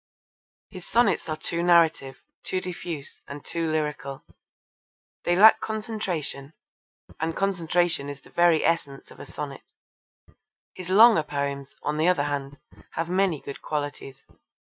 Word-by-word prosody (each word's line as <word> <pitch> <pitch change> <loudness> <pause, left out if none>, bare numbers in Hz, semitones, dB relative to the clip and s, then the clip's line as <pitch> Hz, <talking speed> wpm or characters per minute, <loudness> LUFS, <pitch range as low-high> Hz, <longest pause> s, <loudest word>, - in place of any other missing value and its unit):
His 185 -3 -10
sonnets 210 -7 +2
are 155 - -2
too 170 +2 -2
narrative, 165 -6 +3 0.2
too 185 - -2
diffuse, 170 -5 -7
and 140 0 -9
too 165 -1 -2
lyrical. 150 -3 -3 1.0
They 175 - +3
lack 215 +4 +7
concentration, 190 -10 -4 0.7
and 160 +1 -2
concentration 175 -5 0
is 140 -1 -8
the - - -19
very 170 -2 +3
essence 145 -5 -1
of - - -15
a - - -9
sonnet. 140 -2 -7 1.1
His 185 -1 -8
longer 215 -1 +7
poems, 140 -2 -4
on 150 +1 -1
the 160 +3 +2
other 180 -6 +3
hand, 145 -1 -4 0.4
have 165 +1 -3
many 185 -4 +1
good 140 - -8
qualities. 145 -2 -5
160 Hz, 135 wpm, -25 LUFS, 145-180 Hz, 1.1 s, lack